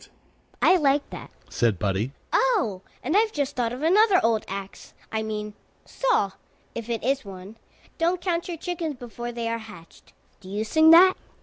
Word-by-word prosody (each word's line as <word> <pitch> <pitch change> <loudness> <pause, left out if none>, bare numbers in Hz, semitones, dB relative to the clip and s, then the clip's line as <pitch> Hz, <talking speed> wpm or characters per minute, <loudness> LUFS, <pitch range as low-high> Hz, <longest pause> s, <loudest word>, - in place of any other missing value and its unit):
"I 370 - +6
like 285 -2 +2
that," - - -8 0.2
said 115 -5 0
Buddie. 100 +6 -1 0.2
"Oh, 375 - +1 0.2
and 310 +8 -1
I've 435 +1 +3
just 285 -4 -2
thought 235 -2 -1
of 255 +4 -6
another 390 +3 +5
old 225 -1 +1
ax 195 0 -8 0.2
I 220 - -1
mean 210 -1 -4 0.3
saw, 480 - 0 0.4
if 230 0 -7
it 230 -1 -2
is 270 +2 0
one 195 +1 -10 0.4
Don't 345 +2 +1
count 345 -1 -2
your 345 -2 -5
chickens 330 -2 -4
before 240 -1 -7
they 235 -1 -4
are 230 0 -2
hatched. 195 -7 -14 0.3
Do 190 -2 -13
you 205 +2 -2
sing 315 +8 +4
that?" 360 +3 +8
240 Hz, 175 wpm, -25 LUFS, 210-335 Hz, 0.4 s, that